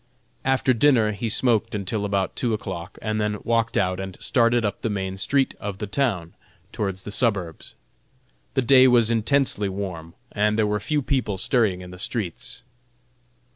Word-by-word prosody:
After 135 -1 +2
dinner 115 -3 +4
he 110 +2 -3
smoked 115 -1 +1
until 105 +1 -2
about 100 -2 -1
two 115 -3 0
o'clock, 90 -4 -7
and 110 0 -1
then 105 0 -1
walked 115 -1 +1
out 95 -1 +1
and 95 -1 -6
started 120 -2 +2
up 100 - -3
the 115 - -1
main 95 -2 -3
street 135 +8 +1
of 100 -2 -5
the 105 - -4
town, 100 -7 -1 0.4
towards 100 -4 -3
the 105 - -6
suburbs. 100 -8 -1 0.8
The 130 - +2
day 130 +1 +7
was 120 -2 +4
intensely 115 -2 +1
warm, 90 -4 -6 0.2
and 105 0 +1
there 110 - +3
were 105 0 0
few 145 +8 -1
people 125 -7 -1
stirring 100 -3 +1
in 90 0 -10
the 90 - -11
streets. 100 -4 -4
105 Hz, 170 wpm, -24 LUFS, 95-120 Hz, 0.8 s, day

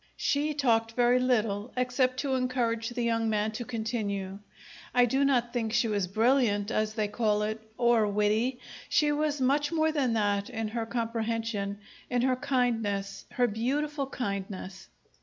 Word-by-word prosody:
She 295 +1 0
talked 230 -5 +2
very 245 +1 +4
little, 225 -3 0
except 255 +1 +1
to 275 -2 -1
encourage 245 -3 0
the 240 0 -3
young 230 -1 +1
man 215 0 0
to 220 +3 -5
continue. 215 -5 -3 0.6
I 245 0 +6
do 265 +4 +1
not 245 -4 +2
think 225 -3 -1
she 235 - +3
was 205 -4 0
brilliant, 220 0 +2
as 215 -1 0
they 215 -2 0
call 210 -1 +1
it, 215 +1 -3 0.2
or 235 -3 +3
witty. 210 +5 +1 0.3
She 300 -1 +3
was 295 0 0
much 285 +3 +2
more 315 -1 +2
than 270 -6 +1
that 205 -2 0
in 225 -2 -3
her 225 0 -3
comprehension, 225 -3 -2 0.3
in 245 -1 +1
her 260 0 +3
kindness 225 -7 -1
her 250 - +3
beautiful 275 +6 -1
kindness! 195 -5 -5
230 Hz, 160 wpm, -29 LUFS, 215-255 Hz, 0.6 s, I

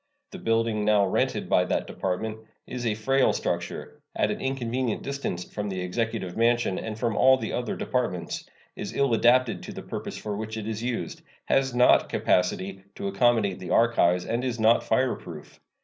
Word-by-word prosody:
The 190 - -8
building 115 -3 +1
now 105 -1 +4
rented 95 - 0
by - - +4
that - - -1
Department 110 +4 -3 0.3
is 125 -1 -4
a 105 - +1
frail 135 +5 +2
structure, - - -4
at - - +1
an - - -4
inconvenient 130 -3 -2
distance 140 -10 -3
from 105 +2 -5
the 95 -1 -3
Executive 105 0 -2
Mansion 115 -3 +2
and 110 -1 -5
from 115 0 0 0.3
the 110 - -4
other 120 -2 -2
Departments, 120 -9 -2 0.3
is - - -6
ill 140 -3 +2
adapted 120 +1 +3
to - - -8
the - - -8
purpose - - -6
for 105 -1 -4
which 110 +1 -5
it 110 -1 -5
is 110 -1 -3
used, 115 -8 -3 0.2
has 135 -2 +1
not 125 0 +5
capacity 95 +1 0
to - - -4
accommodate 105 -1 +2
the 90 - -7
archives, 90 -7 +3
and 115 +2 -1
is 125 -2 -2
not 110 +1 +4
fireproof. 90 - -2
115 Hz, 175 wpm, -26 LUFS, 100-120 Hz, 0.3 s, not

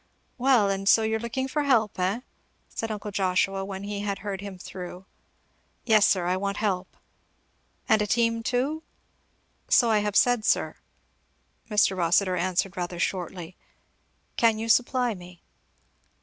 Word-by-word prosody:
"Well, 250 -5 +4
and 195 0 0
so 225 - +5
you're 220 0 0
looking 235 +3 -3
for 295 +3 -1
help, 230 -9 +1
eh?" 190 +6 0 0.5
said 225 - -4
uncle 210 -1 -5
Joshua 195 0 0
when 195 0 -6
he 205 0 -4
had 200 -1 -2
heard 195 -2 -4
him 200 -2 -8
through. 180 0 -9 0.8
"Yes 215 -3 +5
sir, 180 -3 +1
I 180 +1 +1
want 200 +1 -2
help." 190 -4 -2 0.9
"And 220 -3 +4
a 210 - 0
team 230 +1 +1
too?" 260 +7 -1 0.9
"So 235 -2 +5
I 215 - +4
have 205 -1 -2
said, 245 -3 +4
sir," - - +1 0.9
Mr. 210 -2 +3
Rossitur 180 +2 +2
answered 185 +2 -1
rather 175 0 -4
shortly. 175 -1 -3 0.8
"Can 225 -2 +3
you 225 +1 -4
supply 245 +1 +2
me?" 180 -2 -13
205 Hz, 150 wpm, -26 LUFS, 185-225 Hz, 0.9 s, so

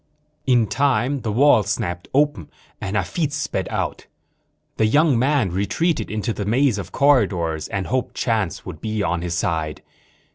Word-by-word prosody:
In 120 -3 +4
time 135 +2 +1
the 110 - -2
wall 130 +1 +5
snapped 90 -3 -3
open 140 - +1 0.3
and 95 +2 -3
Hafitz 150 0 -1
sped 145 - -2
out. - - -3 0.7
The 110 - +3
young 145 0 +3
man 130 - +2
retreated 110 - 0
into 110 +2 -2
the 105 - -4
maze 120 +1 +2
of 90 -2 -7
corridors 90 - +2
and 100 -2 -3
hoped 130 -1 -2
chance 110 -7 -1
would 85 -5 -8
be 110 -1 -2
on 85 -1 -1
his 85 -1 -2
side. 80 -3 -2
110 Hz, 155 wpm, -22 LUFS, 95-135 Hz, 0.7 s, wall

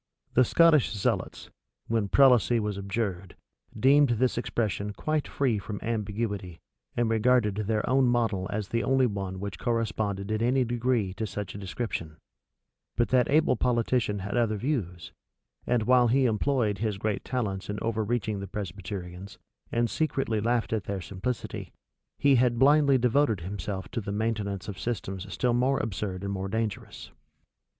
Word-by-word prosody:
The 130 - +6
Scottish 155 -5 +4
zealots, 105 -3 -2 0.3
when 110 -3 0
prelacy 125 -3 +5
was 105 -2 -2
abjured, 100 -2 -3 0.4
deemed 140 +3 +5
this 130 +2 +1
expression 105 -3 -2
quite 155 +6 -1
free 125 -7 0
from 100 +1 -6
ambiguity, 105 -5 -3 0.4
and 120 -1 +2
regarded 115 -1 +3
their 105 +1 -1
own 130 +1 +3
model 115 -6 +1
as 105 -1 -3
the 115 +1 0
only 130 -1 +3
one 100 -4 -3
which 100 -2 -5
corresponded 110 -4 -1
in 110 0 0
any 125 +3 +3
degree 120 -4 0
to 110 +3 -3
such 100 -1 -5
a 100 - -7
description: 90 -6 -4 0.8
but 120 - +1
that 125 0 +3
able 155 -1 +4
politician 115 -2 +1
had 100 - -3
other 115 -3 +1
views; 100 - -3 0.6
and 120 -3 +2
while 125 +1 +5
he 130 +3 +3
employed 110 -2 +1
his 105 -3 -1
great 105 +1 -2
talents 105 -7 -3
in 105 - -3
overreaching 110 -1 -1
the 100 - -5
Presbyterians, 95 -1 -7 0.3
and 120 0 +1
secretly 135 -7 -1
laughed 115 +1 0
at 110 -3 -1
their 100 -2 -3
simplicity, 100 +7 -5 0.4
he 140 -2 +4
had 120 -1 +2
blindly 140 +1 +5
devoted 125 -4 +2
himself 95 +1 -5
to 120 - -3
the 100 - -5
maintenance 105 -3 -2
of 100 -3 -6
systems 100 -4 -4
still 125 -2 +1
more 130 +3 +2
absurd 100 -3 -3
and 100 0 -2
more 95 0 -3
dangerous. 110 +1 -4
110 Hz, 155 wpm, -28 LUFS, 100-125 Hz, 0.8 s, The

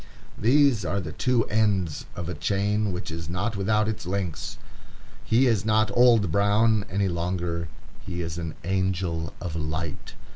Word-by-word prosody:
These 130 -2 +4
are 100 +2 -1
the 80 -5 -5
two 125 +3 +1
ends 100 -7 0
of 85 - -5
a 90 - -3
chain 100 +5 0
which 90 -1 -5
is 80 -1 -6
not 100 +6 -2
without 105 +2 +1
its 110 -4 -4
links. 90 -4 -3 0.7
He 120 +4 +3
is 115 -6 +2
not 110 0 +2
Old 115 -7 +5
Brown 105 +2 +3
any 100 +1 +1
longer; 85 -1 -2 0.4
he 90 0 -4
is 80 0 -4
an 80 -2 -5
Angel 90 -3 -1
of 85 -3 -5
Light. 80 0 -4
95 Hz, 155 wpm, -26 LUFS, 85-110 Hz, 0.7 s, Old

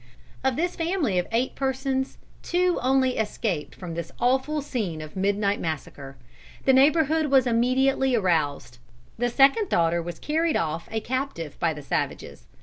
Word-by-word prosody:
Of 265 -1 +1
this 350 +5 -1
family 330 - 0
of 180 - -2
eight 235 +3 0
persons 265 0 -2 0.2
two 360 0 +1
only 260 0 +2
escaped 210 -6 -2
from 180 -3 -7
this 165 0 -5
awful 265 +5 +1
scene 210 - -3
of 155 0 -9
midnight 200 +1 +1
massacre. 140 -3 -5 0.5
The 265 - +5
neighborhood 310 +3 +4
was 270 -2 +4
immediately 255 +2 +2
aroused. 155 - 0 0.4
The 245 0 +1
second 275 - +4
daughter 170 0 +2
was 170 0 -6
carried 320 +1 0
off 165 +1 -2
a 220 0 -2
captive 255 - -3
by 165 -2 +1
the 150 - -9
savages. - - -4
245 Hz, 150 wpm, -25 LUFS, 170-270 Hz, 0.5 s, The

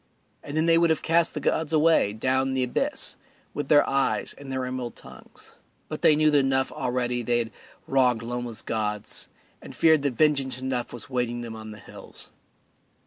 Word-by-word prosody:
And 145 +2 -6
then 160 - +2
they 165 0 +5
would 170 0 +3
have 160 - +1
cast 165 0 +2
the - - -1
gods 160 -1 0
away, 160 -8 +4
down 130 +4 0
the 130 - +2
abyss, 125 - -2 0.4
with 145 - -3
their 145 0 +5
eyes 135 0 0
and 140 -1 -9
their 130 -1 -2
emerald 125 -2 -4
tongues, - - -14 0.3
but - - -5
they 150 - +6
knew 155 0 +4
that 145 - +5
enough 135 -1 +1
already 125 -1 -1
they 120 0 +1
had 115 -2 -2 0.3
wronged 125 -3 +2
Loma's 120 -1 -5
gods, 105 -2 -3 0.3
and - - -11
feared 160 -2 +4
that 140 -3 -1
vengeance 140 -4 +2
enough 130 -2 -2
was 120 -3 -8
waiting 120 -1 -1
them 115 -1 -6
on 110 0 -9
the 105 - -9
hills. 100 - -8
130 Hz, 190 wpm, -26 LUFS, 120-145 Hz, 0.4 s, they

